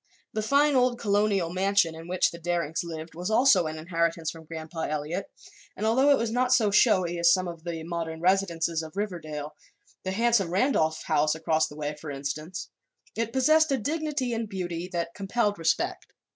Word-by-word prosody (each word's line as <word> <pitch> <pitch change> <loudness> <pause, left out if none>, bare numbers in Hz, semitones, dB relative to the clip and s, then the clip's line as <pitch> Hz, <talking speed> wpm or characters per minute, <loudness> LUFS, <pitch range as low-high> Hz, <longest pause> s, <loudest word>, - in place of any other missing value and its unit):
The 215 - -1
fine 285 +6 +3
old 250 -1 +2
colonial 200 -5 +1
mansion 190 -3 +2
in 165 +1 -10
which 180 +1 +1
the 170 - -9
Darings 170 -2 -1
lived 160 -1 -7
was 180 +4 -4
also 220 -7 +4
an 155 0 -5
inheritance 165 0 -1
from 165 -1 -12
Grandpa 160 0 -5
Eliot, 155 +6 -3 0.5
and 210 - -2
although 260 +6 +4
it 285 - +6
was 230 -1 -1
not 250 +1 +1
so 225 -5 +4
showy 185 -5 +3
as 170 0 +5
some 185 0 +2
of 170 -1 -8
the 165 -2 -4
modern 165 -1 -4
residences 170 -3 +1
of 160 +3 -10
Riverdale 155 -7 -4 0.5
the 185 - -4
handsome 230 -3 +2
Randolph 175 - +1
house 150 +1 +2
across 160 0 +1
the 145 - -12
way, 150 0 -3
for 150 0 -9
instance 145 +6 -5 0.5
it 230 0 -2
possessed 310 +4 +4
a 270 - +2
dignity 290 0 -2
and 225 -2 -3
beauty 175 -3 -4
that 170 -1 -3
compelled 205 0 -1
respect. 165 0 0
175 Hz, 185 wpm, -27 LUFS, 160-220 Hz, 0.5 s, it